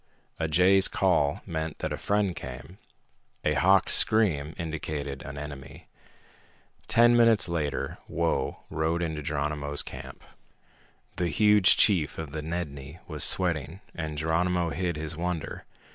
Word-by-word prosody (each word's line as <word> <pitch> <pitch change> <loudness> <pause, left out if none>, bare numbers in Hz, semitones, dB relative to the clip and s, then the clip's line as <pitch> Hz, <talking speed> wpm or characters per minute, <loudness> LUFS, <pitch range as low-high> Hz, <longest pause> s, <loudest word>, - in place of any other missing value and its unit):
A 80 - 0
jay's 90 +5 +4
call 80 -7 +1
meant 80 -3 -4
that 80 -1 -3
a - - -1
friend 100 +1 0
came; 65 +9 -9 0.7
a 75 - +2
hawk's 95 +4 +3
scream 85 -10 +2
indicated 75 -4 -4
an 70 0 -8
enemy. 70 -2 -9 1.0
Ten 120 +1 +5
minutes 115 -4 +5
later 75 -5 -3
Whoa 85 -1 -1
rode 80 +2 -1
into 80 -2 -3
Geronimo's 75 0 -2
camp. - - -9 0.9
The 90 - 0
huge 105 +3 +5
chief 85 -8 +3
of 80 -3 -6
the 75 +1 -4
Nedni 75 -3 -5
was 75 -2 0
sweating, 85 -2 0
and 80 -3 -5
Geronimo 85 +2 0
hid 90 -1 -2
his 80 +1 -4
wonder. 85 -1 -4
80 Hz, 130 wpm, -27 LUFS, 75-90 Hz, 1.0 s, Ten